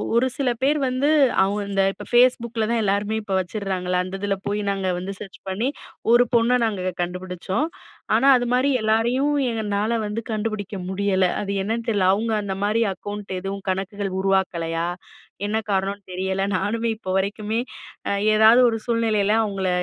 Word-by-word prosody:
ஒரு 245 +2 +4
சில 275 -3 +1
பேர் 285 +3 +3
வந்து 255 +4 +1 0.3
அவுங்க 205 +2 0
இந்த 195 0 +2
இப்ப - - -10
Facebookல 235 -2 +3
தான் 235 -1 +1
எல்லாருமே 205 +2 0
இப்ப 205 -2 -5
வச்சுர்றாங்கல்ல, 185 -1 -2
அந்த 185 +1 -5
இதில 200 -1 0
போயி 205 +1 -1
நாங்க 195 -1 -2
வந்து 190 +2 -5
சர்ச் 195 -2 -10
பண்ணி, 205 +6 -1 0.4
ஒரு 240 +1 +7
பொண்ண 235 +1 +4
நாங்க 185 -4 -2
கண்டுபுடுச்சோம். 180 - -2 0.5
ஆனா, 270 - +4
அதுமாரி 250 +3 +1
எல்லாரையும் 240 +7 +2 0.3
என்னால 210 +3 0
வந்து 210 +2 -3
கண்டுபிடிக்க 215 -2 -3
முடியல. 190 -1 +1 0.2
அது 200 -1 -3
என்னனு 225 +4 -2
தெரில, 200 -4 +2
அவுங்க 225 +3 -1
அந்த 200 -2 -3
மாரி 215 +3 +1
அக்கௌண்ட் 205 0 -7
எதுவும், 195 +1 -5
கணக்குகள் 195 +1 -2
உருவாக்கலையா? 170 -4 0 0.6
என்ன 210 +2 0
காரணம்னு 200 +1 -1
தெரியல. 190 +1 -2
நானுமே 225 +4 -1
இப்போ 190 -4 -5
வரைக்குமே 210 +3 -1 0.8
ஏதாவது 220 +3 +7
ஒரு 225 -1 +1
சூழ்நிலையில, 220 -3 +1
"அவுங்கள 195 -3 -2
205 Hz, 150 wpm, -23 LUFS, 190-230 Hz, 0.8 s, ஒரு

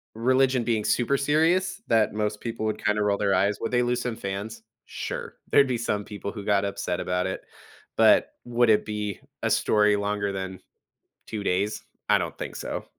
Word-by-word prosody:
religion 130 +2 +3
being 110 -2 0
super 125 +3 +2
serious 165 +7 +2
that 110 -2 +3
most 105 0 -1
people 115 -2 -4
would 110 -1 -2
kinda 105 0 +2
roll 100 -1 +2
their 100 -1 +1
eyes. 100 +2 +2
Would 115 - -2
they 120 0 +3
lose 120 0 0
some 120 -2 -3
fans? 105 +1 -5 0.2
Sure. - - -5 0.2
There'd 140 -1 +6
be 125 -2 0
some 105 -3 -2
people 100 -1 -6
who 105 -2 -8
got 100 -1 +2
upset 90 -3 -2
about 90 0 -1
it, 95 - -4 0.6
but - - +5
would 120 -1 +2
it 105 - +4
be 105 -2 -3 0.2
a - - +2
story 105 -1 +3
longer 100 0 -1
than 95 -1 -5 0.7
2 110 -2 -4
days? 100 +4 0 0.2
I - - +5
don't - - -4
think - - -5
so. - - -4
105 Hz, 190 wpm, -26 LUFS, 100-120 Hz, 0.7 s, There'd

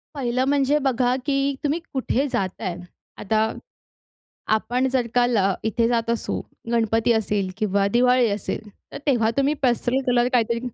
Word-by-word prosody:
पहिलं 255 -2 0
म्हणजे 280 +1 +2
बघा, 250 -1 +2
की 280 0 +1
तुम्ही 295 +3 0
कुठे 265 +1 0
जाताय. 190 -6 -2 0.4
आता, 220 +1 0 1.0
आपण 245 +4 0
जर 255 -2 0
का 245 - +5 0.2
अ, 195 0 +2
इथे 230 +1 +1
जात 230 -1 0
असू, 235 - -1 0.3
गणपती 225 0 +2
असेल 210 -3 0
किंवा 200 -2 +1
दिवाळी 250 +2 +3
असेल, 210 +1 -4 0.2
तर - - -6
तेव्हा 235 -5 +3
तुम्ही 275 +2 +2
पेस्टल 245 +1 +1
कलर 245 -1 +3
काहीतरी 235 -1 +2
240 Hz, 145 wpm, -23 LUFS, 220-260 Hz, 1.0 s, का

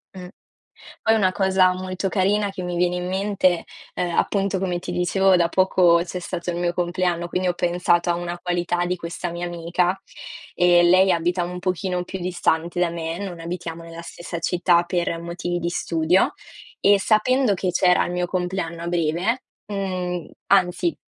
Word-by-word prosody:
Mh. 180 -1 -8 0.7
Poi 225 - +3
una 195 -4 +3
cosa 190 0 +3
molto 185 +1 -3
carina 205 +2 +1
che 195 - -7
mi 180 -1 -3
viene 180 0 +1
in 180 0 -3
mente 190 -2 +1 0.3
,ehm, 175 -1 -2
appunto, 195 -1 +1
come 180 -2 -1
ti 175 - -6
dicevo, 185 +2 +3
da 170 -1 +3
poco 180 -1 +4
c'è 180 +1 -6
stato 175 0 -4
il 170 - -4
mio 175 0 0
compleanno, 175 -1 -1
quindi 180 +1 -1
ho 180 - +2
pensato 175 0 +1
a 170 - +2
una 175 0 -4
qualità 175 0 -1
di 180 +1 -1
questa 170 +1 -5
mia 175 +1 -4
amica 175 +2 -1 0.6
e 175 -1 +5
lei 185 +2 +5
abita 175 +2 0
un 180 +1 -5
pochino 180 0 -2
più 190 +1 -6
distante 175 -1 -1
da 175 - +2
me, 165 0 -4
non 185 -4 -6
abitiamo 165 0 -6
nella 165 0 -9
stessa 170 0 -7
città, 175 0 +2
per 175 -1 -1
motivi 175 +1 -3
di 170 0 -2
studio 170 +1 +1 0.5
e 200 0 +5
sapendo 230 +3 +3
che 185 -1 -1
c'era 180 0 +3
il - - -4
mio 180 0 -1
compleanno 180 -2 -3
a - - -4
breve, 175 +8 0 0.2
mhmm, 185 -4 -3 0.2
anzi 195 - +2
180 Hz, 175 wpm, -23 LUFS, 175-185 Hz, 0.7 s, e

